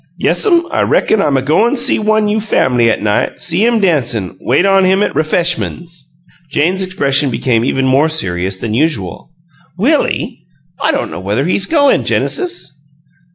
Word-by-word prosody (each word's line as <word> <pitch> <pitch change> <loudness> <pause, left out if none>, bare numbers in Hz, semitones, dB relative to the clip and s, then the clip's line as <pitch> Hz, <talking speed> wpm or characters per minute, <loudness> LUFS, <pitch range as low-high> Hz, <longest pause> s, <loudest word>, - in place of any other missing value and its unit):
"Yes'm. 345 -5 +2
I - - 0
reckon 215 - +1
I'm 145 -7 +1
a 130 - -1
go'n' 210 - +2
a - - -1
see 240 - +1
one 215 0 +1
you' 210 +1 0
fam'ly 125 - +1
'at 110 - -1
night; 105 -1 -1
see 175 +4 +1
him 235 -1 +2
dancin' 120 - 0
wait 135 +9 +1
on 195 -1 +3
him 190 +2 +2
at - - -2
ref'eshmuns." 170 +2 -1 0.6
Jane's 175 +7 0
expression 145 -7 0
became 120 -2 0
even 135 +1 0
more 135 +4 +2
serious 95 - -2
than 110 +2 -4
usual. 115 - -2 0.5
"Willie? 280 - -1 0.3
I - - +2
don't - - -3
know 80 - -6
whether 105 +8 -1
he's 195 +3 0
goin', 285 -4 +2
Genesis." 355 - -3
160 Hz, 165 wpm, -14 LUFS, 125-210 Hz, 0.6 s, on